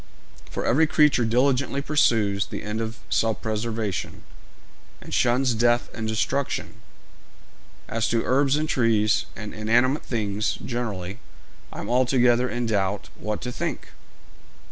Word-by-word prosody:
For -, -, -4 dB
every 155 Hz, +7 st, +4 dB
creature 150 Hz, -6 st, +4 dB
diligently 130 Hz, +4 st, +1 dB
pursues 115 Hz, -9 st, +2 dB
the -, -, -6 dB
end 105 Hz, +2 st, -3 dB
of 115 Hz, +1 st, -4 dB
self 110 Hz, -2 st, +1 dB
preservation, 110 Hz, -3 st, -3 dB, 0.8 s
and -, -, -10 dB
shuns 125 Hz, +1 st, +2 dB
death 120 Hz, +1 st, +2 dB
and 110 Hz, -1 st, -4 dB
destruction! 130 Hz, +5 st, -2 dB, 1.1 s
As 115 Hz, 0 st, -1 dB
to 115 Hz, -1 st, +1 dB
herbs 135 Hz, +2 st, +3 dB
and 155 Hz, +1 st, -1 dB
trees, 115 Hz, -5 st, +2 dB
and 105 Hz, -1 st, -7 dB
inanimate 120 Hz, +6 st, +2 dB
things 105 Hz, -2 st, -1 dB
generally, 105 Hz, -5 st, -4 dB, 0.5 s
I -, -, -6 dB
am -, -, -6 dB
altogether 125 Hz, -1 st, +3 dB
in 120 Hz, 0 st, -2 dB
doubt 100 Hz, -2 st, -1 dB
what 105 Hz, 0 st, -4 dB
to 125 Hz, -, -4 dB
think.' -, -, -4 dB
115 Hz, 130 wpm, -24 LUFS, 110-125 Hz, 1.1 s, every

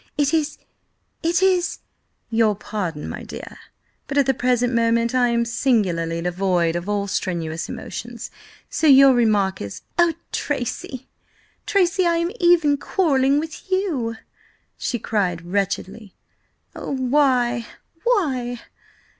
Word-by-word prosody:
It 290 Hz, +1 st, +2 dB
is–it 325 Hz, +3 st, -3 dB
is—" 370 Hz, -2 st, +2 dB, 0.5 s
"Your 225 Hz, -2 st, +3 dB
pardon, 185 Hz, -7 st, -4 dB
my -, -, -6 dB
dear, -, -, -9 dB, 0.5 s
but 280 Hz, -, -3 dB
at 280 Hz, -, +5 dB
the 270 Hz, -, +3 dB
present 245 Hz, 0 st, +1 dB
moment 230 Hz, +1 st, +2 dB
I 250 Hz, -1 st, +3 dB
am 235 Hz, 0 st, +1 dB
singularly 185 Hz, -9 st, 0 dB
devoid 175 Hz, -2 st, +1 dB
of 175 Hz, +3 st, -3 dB
all 205 Hz, -1 st, 0 dB
strenuous 170 Hz, -4 st, -3 dB
emotions, 235 Hz, -1 st, -7 dB, 0.4 s
so 320 Hz, -, 0 dB
your 275 Hz, -1 st, +8 dB
remark 210 Hz, -6 st, +2 dB
is—" 100 Hz, -1 st, -7 dB, 0.2 s
"Oh, 345 Hz, -1 st, +5 dB, 0.2 s
Tracy, 260 Hz, -1 st, -3 dB, 0.6 s
Tracy, 370 Hz, -1 st, +2 dB
I 335 Hz, 0 st, +2 dB
am 340 Hz, +1 st, 0 dB
even 345 Hz, -5 st, +4 dB
quarrelling 280 Hz, -4 st, +2 dB
with 320 Hz, +4 st, -7 dB
you!" 310 Hz, -, 0 dB, 0.6 s
she 240 Hz, -, -2 dB
cried 190 Hz, -7 st, -1 dB
wretchedly. 195 Hz, +2 st, -3 dB, 0.6 s
"Oh, -, -, -6 dB
why?–why?" 260 Hz, -, 0 dB
245 Hz, 120 wpm, -22 LUFS, 200-295 Hz, 0.6 s, your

